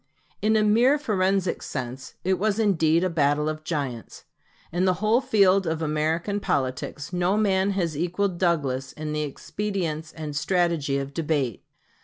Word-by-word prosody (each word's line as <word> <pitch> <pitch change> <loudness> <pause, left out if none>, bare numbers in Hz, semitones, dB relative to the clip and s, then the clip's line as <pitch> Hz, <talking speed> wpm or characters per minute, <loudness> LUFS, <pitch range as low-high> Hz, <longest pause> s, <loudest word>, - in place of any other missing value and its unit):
In 220 +1 +3
a 215 - +4
merely 235 +7 +4
forensic 195 -8 0
sense, 130 -1 -6
it 185 -1 +1
was 210 +1 +1
indeed 170 -6 +3
a - - +3
battle 150 -1 +2
of 155 0 -3
giants. 140 -8 -4 0.5
In 175 +2 +1
the 185 -1 +3
whole 215 +5 +2
field 195 -7 +3
of 160 -1 -1
American 160 +6 0
politics 140 0 -2
no 180 +3 +1
man 195 -2 +2
has 170 -5 -1
equaled 180 +3 -1
Douglas 140 -7 0
in 155 0 -5
the 150 - -1
expedients 160 0 -3
and 150 -2 -6
strategy 165 -3 +1
of 140 0 -4
debate. 145 - -1
170 Hz, 155 wpm, -25 LUFS, 150-195 Hz, 0.5 s, a